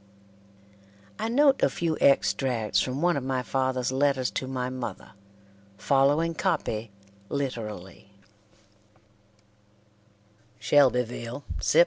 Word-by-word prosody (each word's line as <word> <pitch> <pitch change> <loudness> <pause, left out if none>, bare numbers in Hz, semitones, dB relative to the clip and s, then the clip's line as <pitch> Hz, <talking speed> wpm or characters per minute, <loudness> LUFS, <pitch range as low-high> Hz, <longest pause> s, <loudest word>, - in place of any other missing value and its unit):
I - - -1
note 275 +3 +3
a - - +4
few 165 -2 -1
extracts 120 -7 +2
from 130 +4 -3
one 175 -1 +3
of 140 - -2
my 130 -1 -1
father's 130 -1 -1
letters 130 -3 +1
to 130 - -3
my 130 -1 -3
mother, 125 -6 -6 0.7
following 145 +7 +2
copy 145 - -2 0.4
literally: 110 -10 -5 2.5
"SHELBYVILE, 125 -2 +1 0.2
Sept. - - +3
130 Hz, 95 wpm, -27 LUFS, 125-145 Hz, 2.5 s, a